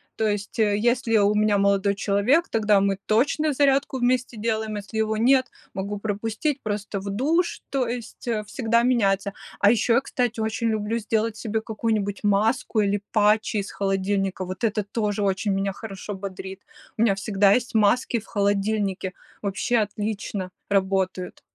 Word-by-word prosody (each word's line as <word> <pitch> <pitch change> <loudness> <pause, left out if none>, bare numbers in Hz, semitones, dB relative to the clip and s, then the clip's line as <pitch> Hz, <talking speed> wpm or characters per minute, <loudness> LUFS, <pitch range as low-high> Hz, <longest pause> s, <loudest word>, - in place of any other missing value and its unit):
То 220 - 0
есть, 205 +1 -3
э, 205 -2 +3
если 235 0 +2
у 205 0 +4
меня 210 -1 +3
молодой 200 0 +2
человек, 210 +11 +2
тогда 210 -2 +3
мы 195 0 +1
точно 285 +7 +2
зарядку 275 0 +2
вместе 250 -1 0
делаем, 220 0 -2
если 205 +1 -6
его 220 0 0
нет, 260 +3 +4 0.3
могу 200 +2 -3
пропустить, 220 +7 -2
просто 205 -1 -3
в 200 +1 -6
душ, 305 - 0
то 265 -3 0
есть, 240 +1 -6
э, 220 -3 0
всегда 235 +1 +1
меняется. 200 -5 +2 0.3
А 205 - +6
ещё 235 0 +2
я, 255 - +4
кстати, 245 -4 -2
очень 220 +1 -1
люблю 220 +1 -1
сделать 220 0 -1
себе 220 -1 -2
какую-нибудь 215 -2 -2
маску 215 +3 +2
или 205 0 0
патчи 215 0 +2
из 200 0 -3
холодильника. 195 -1 -1
Вот 185 +3 -7
это 215 -1 +1
тоже 205 0 -2
очень 195 +1 0
меня 195 0 -1
хорошо 205 -1 -7
бодрит. 190 0 -7 0.4
У - - 0
меня 220 -4 +4
всегда 195 0 +2
есть 250 +1 0
маски 225 +3 +2
в 220 - -15
холодильнике, 200 -2 0 0.3
вообще 200 +4 0
отлично 205 -2 -3 0.2
работают. 190 -2 0
210 Hz, 160 wpm, -24 LUFS, 200-230 Hz, 0.4 s, А